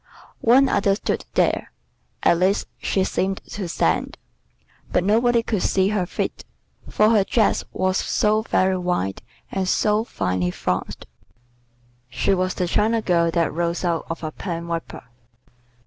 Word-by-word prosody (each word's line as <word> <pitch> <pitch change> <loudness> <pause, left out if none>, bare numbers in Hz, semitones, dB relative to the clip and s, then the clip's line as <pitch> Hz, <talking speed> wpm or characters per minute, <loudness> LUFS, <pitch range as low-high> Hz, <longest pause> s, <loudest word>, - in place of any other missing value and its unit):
One 260 +4 +5
other 200 -4 +2
stood - - -3
there, - - +1 0.5
at 170 - +4
least 190 +3 +1
she 190 - 0
seemed 190 0 -1
to 195 -3 -4
stand, 80 - 0 0.7
but 180 - +2
nobody 230 +4 +3
could 215 -5 -1
see 190 0 +2
her 200 -4 -1
feet, - - -3 0.5
for 215 +1 +3
her 210 -3 +4
dress 220 +2 +1
was 185 0 0
so 215 +1 +1
very 190 -4 +1
wide 175 - -2 0.3
and 190 -1 -1
so 210 +3 +2
finely 90 - -1
flounced. - - -3 1.0
She 165 - +1
was 185 0 0
the 180 - 0
china 220 +5 +1
girl 170 -2 +2
that 165 -2 0
rose 170 +2 -1
out 170 -2 -1
of 165 0 -5
a 155 - -3
pen 170 0 -5
wiper. 170 -1 -5
185 Hz, 150 wpm, -22 LUFS, 170-210 Hz, 1.0 s, One